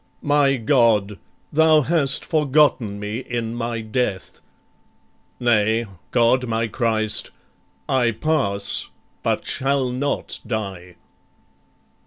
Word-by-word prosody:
My 145 -1 +3
God, 110 - +2 0.3
thou 155 0 +5
hast 145 -2 +2
forgotten 145 - +2
me 105 +3 -4
in 120 -3 -4
my 115 -1 -3
death: 110 -3 -3 1.0
Nay 115 -1 +2 0.2
God 125 +1 +2
my 115 0 -1
Christ 110 -2 0 0.6
I 130 -3 +2
pass 110 -5 -1 0.3
but - - -1
shall 135 -1 0
not 140 +3 -3
die." 95 -6 -5
120 Hz, 95 wpm, -21 LUFS, 110-135 Hz, 1.0 s, thou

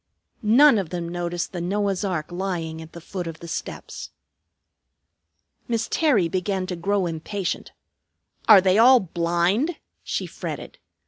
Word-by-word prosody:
None 235 +3 +6
of 185 -5 -4
them 175 -1 -4
noticed 175 0 -3
the 175 - -5
Noah's 195 +1 -1
ark 175 -5 -2
lying 175 -3 -3
at 160 0 -12
the 170 - -8
foot 180 +1 -5
of 160 -1 -7
the 170 - -9
steps. - - -6 1.6
Miss 230 -1 -1
Terry 255 - +3
began 185 +1 -1
to 185 - -4
grow 195 +2 0
impatient. 175 +4 -4 0.8
"Are 205 -3 +10
they 190 +2 +3
all 250 +2 +8
blind?" 175 - 0 0.2
she - - -3
fretted. - - -7
185 Hz, 140 wpm, -24 LUFS, 170-205 Hz, 1.6 s, Are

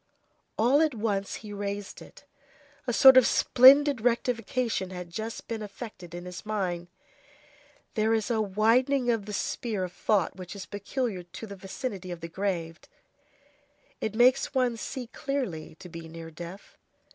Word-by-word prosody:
All 255 +7 +4
at 310 -5 +2
once 205 -3 -1
he 205 - -7
raised 200 0 -5
it. - - -14 0.6
A - - +1
sort 265 +2 +8
of 255 - +7
splendid 275 0 +6
rectification 235 -3 0
had 180 -2 -7
just 220 +5 -5
been 225 -1 -4
effected 200 -4 -8
in 175 0 -7
his 180 -1 -8
mind. 185 -5 -2 1.1
There 220 +1 +1
is 225 +1 +1
a 220 -2 +2
widening 240 +6 +2
of 215 -3 -2
the - - -5
sphere 210 -1 -2
of 180 -1 -5
thought 190 0 +1
which 185 +1 -8
is 200 - -7
peculiar 205 0 -3
to 175 +5 -9
the 200 -2 -8
vicinity 195 0 -6
of 175 -2 -6
the 165 - -5
grave; 170 -3 -3 1.2
it 220 -1 -3
makes 255 +4 +4
one 250 -2 +2
see 250 +3 -5
clearly 245 - -4
to 180 - -11
be 165 -1 -9
near 165 0 -9
death. 175 +4 -10
210 Hz, 155 wpm, -28 LUFS, 180-245 Hz, 1.2 s, sort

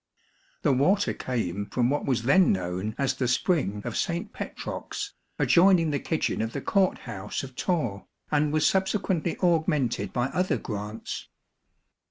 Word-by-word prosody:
The - - +4
water 185 +11 +3
came 100 -6 -3
from 125 +2 +1
what 145 - -1
was 120 -4 +1
then 165 +9 +5
known 95 +3 -2
as 135 -1 +1
the 130 -1 -1
spring 125 - +1
of 120 - -3
St. 170 +1 -2
Petrox, 410 -1 -5 0.2
adjoining 175 -3 +5
the 145 - 0
kitchen 160 - -1
of 115 +1 -2
the - - -2
court 190 +3 +2
house 105 -2 -4
of 130 -1 -9
Torre, 125 - -1 0.2
and 150 0 +2
was 155 0 +2
subsequently 190 -3 +1
augmented 160 -7 +1
by 125 +1 0
other 180 +6 0
grants. 105 0 -5
140 Hz, 150 wpm, -27 LUFS, 115-170 Hz, 0.2 s, then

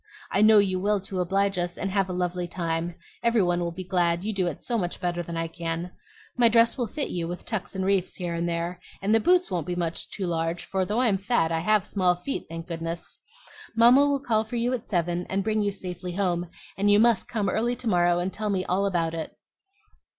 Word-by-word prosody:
I 200 - +2
know 215 0 +7
you 190 -2 +3
will 205 +2 +1
to 190 -1 -5
oblige 195 +1 +1
us, 175 0 -2
and 195 - -2
have 195 -1 +1
a - - -2
lovely 180 0 -2
time. 170 -1 -2 0.3
Every 235 -3 +3
one 175 -1 +1
will 170 -1 -1
be 185 +2 -6
glad, 175 -2 +1
you 215 +1 -2
do 190 -3 0
it 175 - -5
so 240 - -2
much 180 -6 -2
better 175 -1 -1
than 170 0 -6
I 165 0 -1
can. 165 +1 -4 0.4
My 240 -2 +5
dress 230 0 +4
will 245 -3 -1
fit 290 +6 -3
you, 170 -2 -2
with 175 +1 -6
tucks 205 -2 -4
and 190 0 -1
reefs 195 -2 +1
here 175 -2 -3
and 170 +1 -1
there; 170 +1 -2 0.2
and 205 +2 +2
the 225 - +5
boots 360 +7 +3
won't 170 -4 -2
be 180 - -2
much 170 -2 -2
too 195 - -4
large, 165 0 -2
for 190 -1 -1
though 215 +6 0
I'm 215 -6 +2
fat 195 -5 +1
I 165 - +1
have 210 +3 +2
small 185 -4 +2
feet, 225 +10 -5
thank 165 0 -6
goodness! 165 0 -5 0.6
Mamma 240 +4 +7
will 285 -1 +1
call 225 -5 +1
for 220 +2 -7
you 240 +2 0
at 245 - -4
seven, 175 -1 -1
and 195 +1 0
bring 215 +1 +1
you 205 -1 +1
safely 180 -2 -6
home; 175 -2 -1 0.3
and 200 +1 +1
you 205 0 +6
must 230 -2 +3
come 210 -4 -1
early 230 +6 0
to 245 0 -6
morrow 175 -3 +3
and 180 +2 -2
tell 215 0 -3
me 190 -2 0
all 195 +3 +1
about 165 -4 0
it. 160 -1 -6
185 Hz, 240 wpm, -26 LUFS, 175-215 Hz, 0.6 s, know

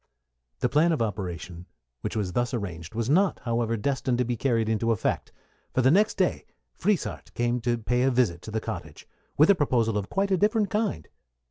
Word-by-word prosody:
The - - +3
plan 160 +4 +3
of 150 - -1
operations 90 -4 -5 0.3
which - - -4
was 100 -5 -2
thus 120 +1 0
arranged 85 -4 -6
was 115 0 -1
not, 185 +8 +3
however, 115 -1 0
destined 130 +1 0
to 125 - +1
be 120 +1 -1
carried 115 -2 +1
into 110 +1 +1
effect, 110 - -1 0.4
for 130 - +3
the 130 - +5
next 210 +6 +3
day 185 -2 0 0.3
Frieshardt 200 0 -1
came 120 0 0
to 120 0 0
pay 125 +2 0
a 130 - +4
visit 120 -10 +1
to - - -9
the 110 +1 -1
cottage, - - -7 0.3
with 155 +7 +7
a - - +4
proposal 115 - +1
of 100 - -6
quite 195 0 0
a 190 - +4
different 210 +2 +2
kind. 215 -1 -1
120 Hz, 200 wpm, -26 LUFS, 110-150 Hz, 0.4 s, with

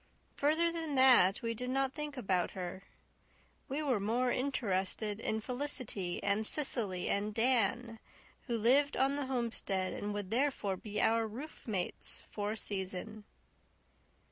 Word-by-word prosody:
Further 320 +4 +2
than 325 -3 -4
that 250 -8 +5
we 230 0 -1
did 250 +3 -4
not 270 0 0
think 300 -2 -6
about 190 -7 0
her. 180 +1 -6 0.9
We 285 +3 -3
were 260 -7 0
more 240 +5 0
interested 210 -5 -1
in 220 -1 -2
Felicity 250 -8 -4
and 200 +2 +1
Cecily 215 -8 +6
and 205 +1 -1
Dan, 230 -1 0 0.5
who 235 -2 -1
lived 270 +6 +3
on 270 +1 +1
the 285 -2 -3
homestead 230 -7 -2
and 205 - -5
would 205 -1 -5
therefore 240 -6 0
be 210 +2 -5
our 225 0 +2
roofmates 220 - -5
for 205 0 -3
a - - -6
season. 200 +2 -4
230 Hz, 140 wpm, -32 LUFS, 205-265 Hz, 0.9 s, Cecily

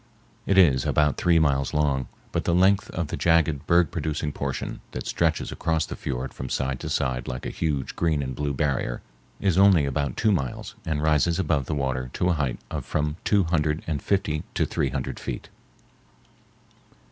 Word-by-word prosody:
It 100 - +3
is 70 -9 +6
about 75 -1 +2
three 85 -1 +3
miles 70 -2 +2
long, 70 -4 +1 0.2
but - - -1
the 85 - +2
length 95 +2 +4
of 85 -3 -3
the - - -2
jagged, 80 -4 +2
berg 85 -2 +4
producing 75 -1 -2
portion - - -4
that - - -5
stretches 80 -2 0
across 80 -1 0
the - - -6
fiord 65 0 -4
from 65 - -6
side 65 0 -1
to - - -5
side 65 -1 -1
like 65 0 -5
a - - -3
huge 75 -5 -2
green 80 -4 +1
and 65 -1 -4
blue 70 +3 -2
barrier 65 -4 -1 0.4
is 95 -3 +2
only 95 -7 +6
about 70 -1 -2
two 110 - +3
miles 70 -10 -2
and 75 -2 -1
rises 80 +2 +3
above 75 -7 0
the 75 - -1
water 65 -2 -2
to 90 - +1
a - - +4
height 70 -6 -1
of - - -3
from 75 0 -1
two 100 -2 +3
hundred 80 -2 0
and 75 -4 -2
fifty 80 -7 0
to - - +2
three 70 - -1
hundred 65 0 -4
feet. - - -6
75 Hz, 190 wpm, -25 LUFS, 70-85 Hz, 0.4 s, is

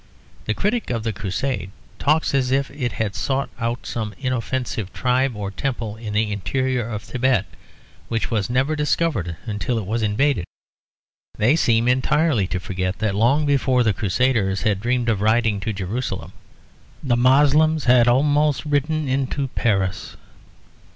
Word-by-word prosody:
The 110 - -1
critic 225 +3 -1
of 115 -3 -2
the 110 -1 -2
Crusade 100 +3 -3 0.3
talks 155 +1 +2
as 130 -2 +1
if 135 +1 0
it 130 -4 -3
had 105 -2 -2
sought 135 +4 -2
out 115 +1 -2
some 110 -2 -4
inoffensive 125 -5 -3
tribe 130 0 +1
or 100 -1 -4
temple 115 -2 -3
in 110 -2 -6
the 105 0 +1
interior 125 +4 -1
of 105 -2 -5
Thibet, 125 -5 +1 0.6
which 115 +1 -2
was 110 -2 0
never 130 +5 +1
discovered 150 - 0
until 105 +2 -2
it 110 - -3
was 110 +4 -1
invaded. 110 -1 +1 0.9
They 120 +8 +3
seem 115 -6 +2
entirely 130 - +2
to 90 - -2
forget 95 +1 -3
that 110 -2 -1
long 125 +9 +3
before 135 -3 +2
the 110 -3 +2
Crusaders 100 -1 0
had 105 -3 +1
dreamed 120 +2 0
of 110 -4 +1
riding 110 -1 +2
to 110 - -3
Jerusalem, 105 +5 -4 0.7
the 130 -4 +2
Moslems 145 +5 +4
had 120 -1 +5
almost 145 +4 +2
ridden 150 +1 0
into 135 +1 -1
Paris. 95 -6 -1
120 Hz, 150 wpm, -22 LUFS, 105-135 Hz, 0.9 s, had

